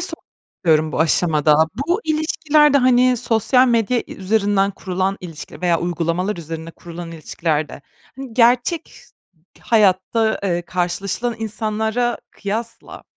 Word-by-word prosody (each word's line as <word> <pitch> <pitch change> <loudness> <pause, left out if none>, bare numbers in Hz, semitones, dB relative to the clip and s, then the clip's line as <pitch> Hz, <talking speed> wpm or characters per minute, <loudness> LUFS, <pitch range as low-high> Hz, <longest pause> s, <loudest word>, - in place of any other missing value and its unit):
sormak - - -3 0.3
istiyorum 155 -2 +2
bu - - -2
aşamada, 155 -2 +3 0.3
bu 355 +6 +1
ilişkilerde, 305 -2 +3
hani, 255 0 +4
sosyal 245 +3 +3
medya 235 +1 +2
i - - -10
üzerinden 200 0 +1
kurulan 190 0 -2
ilişkiler 165 -4 -9
veya 175 -2 +1
uygulamalar 175 +3 -1
üzerine 165 0 -7
kurulan 170 0 -9
ilişkilerde, 155 -2 -3 0.3
hani, 265 -4 -8
gerçek 250 +7 +3
ş - - -17 0.6
hayatta, 220 +1 +2
eee, 175 -3 -1
karşılaşılan 185 +7 -2
insanlara 220 +2 -2
kıyasla 220 +3 -6
200 Hz, 120 wpm, -20 LUFS, 175-240 Hz, 0.6 s, hani